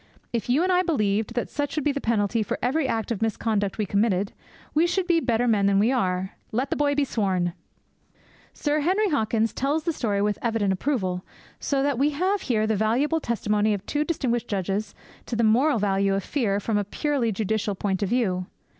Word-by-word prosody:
If 235 Hz, 0 st, -2 dB
you 280 Hz, +7 st, +3 dB
and 370 Hz, -, +2 dB
I 360 Hz, 0 st, +4 dB
believed 220 Hz, -, 0 dB
that 240 Hz, -, -2 dB
such 290 Hz, -1 st, -2 dB
would 305 Hz, -, -2 dB
be 295 Hz, -, +3 dB
the 280 Hz, 0 st, -3 dB
penalty 220 Hz, 0 st, +1 dB
for 210 Hz, -, -2 dB
every 270 Hz, +3 st, +1 dB
act 225 Hz, -2 st, -2 dB
of 225 Hz, -, -2 dB
misconduct 215 Hz, -2 st, 0 dB
we 215 Hz, -, 0 dB
committed, 200 Hz, -1 st, +1 dB, 0.4 s
we 320 Hz, +3 st, +3 dB
should 375 Hz, +1 st, 0 dB
be 345 Hz, -2 st, +3 dB
better 245 Hz, -4 st, +1 dB
men 205 Hz, -4 st, +3 dB
than 200 Hz, -1 st, +3 dB
we 215 Hz, +5 st, +3 dB
are. 190 Hz, -6 st, 0 dB, 0.2 s
Let 255 Hz, +5 st, -1 dB
the -, -, +2 dB
boy 285 Hz, -1 st, +1 dB
be 290 Hz, -, +2 dB
sworn!"' 185 Hz, -8 st, 0 dB, 1.0 s
Sir 295 Hz, 0 st, 0 dB
Henry 380 Hz, +7 st, +2 dB
Hawkins 225 Hz, -4 st, +1 dB
tells 290 Hz, +4 st, 0 dB
the 335 Hz, -, 0 dB
story 210 Hz, -8 st, -1 dB
with 205 Hz, 0 st, 0 dB
evident 225 Hz, -4 st, +1 dB
approval, 185 Hz, -6 st, -1 dB, 0.4 s
so 275 Hz, -1 st, 0 dB
that 280 Hz, -3 st, 0 dB
we 285 Hz, +2 st, +4 dB
have 380 Hz, +4 st, +1 dB
here 220 Hz, -4 st, +1 dB
the 220 Hz, 0 st, +1 dB
valuable 245 Hz, +10 st, +1 dB
testimony 210 Hz, -4 st, 0 dB
of 200 Hz, 0 st, -8 dB
two 295 Hz, 0 st, 0 dB
distinguished 245 Hz, -7 st, -1 dB
judges 200 Hz, +1 st, -2 dB, 0.3 s
to 240 Hz, -, -3 dB
the 230 Hz, -, +1 dB
moral 245 Hz, +6 st, +4 dB
value 195 Hz, -1 st, +1 dB
of 195 Hz, -, -2 dB
fear 215 Hz, -9 st, 0 dB
from 205 Hz, 0 st, 0 dB
a -, -, 0 dB
purely 255 Hz, +3 st, -1 dB
judicial 210 Hz, 0 st, -1 dB
point 190 Hz, 0 st, -1 dB
of 200 Hz, -, 0 dB
view. 185 Hz, -7 st, 0 dB
225 Hz, 205 wpm, -25 LUFS, 205-285 Hz, 1.0 s, I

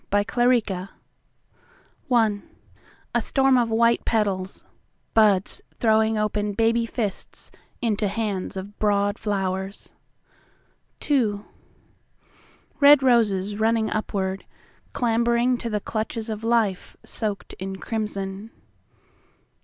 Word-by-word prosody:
The 205 Hz, 0 st, +2 dB
Year 245 Hz, +1 st, +4 dB, 1.6 s
IA 220 Hz, -4 st, -2 dB
STORM 270 Hz, -1 st, +3 dB
of 235 Hz, -1 st, +1 dB
white 230 Hz, +1 st, +3 dB
petals, 200 Hz, -4 st, -1 dB, 0.5 s
Buds 205 Hz, -4 st, +3 dB
throwing 220 Hz, -1 st, +2 dB
open 210 Hz, -1 st, -1 dB
baby 230 Hz, +2 st, +2 dB
fistsInto 215 Hz, 0 st, -3 dB
hands 200 Hz, -3 st, -3 dB
of 200 Hz, +2 st, -8 dB
broad 205 Hz, 0 st, +1 dB
flowers. 195 Hz, -1 st, -3 dB, 1.1 s
IIRed 220 Hz, -9 st, +1 dB, 1.6 s
roses 210 Hz, -5 st, +2 dB
running 220 Hz, 0 st, +1 dB
upward, 195 Hz, -3 st, -2 dB, 0.5 s
Clambering 235 Hz, +1 st, +1 dB
to 235 Hz, -, -4 dB
the 210 Hz, -1 st, -1 dB
clutches 220 Hz, +1 st, -4 dB
of 215 Hz, -1 st, -5 dB
lifeSoaked 220 Hz, -1 st, -2 dB
in 190 Hz, +1 st, -4 dB
crimson. 200 Hz, -1 st, -4 dB
215 Hz, 85 wpm, -24 LUFS, 200-230 Hz, 1.6 s, Year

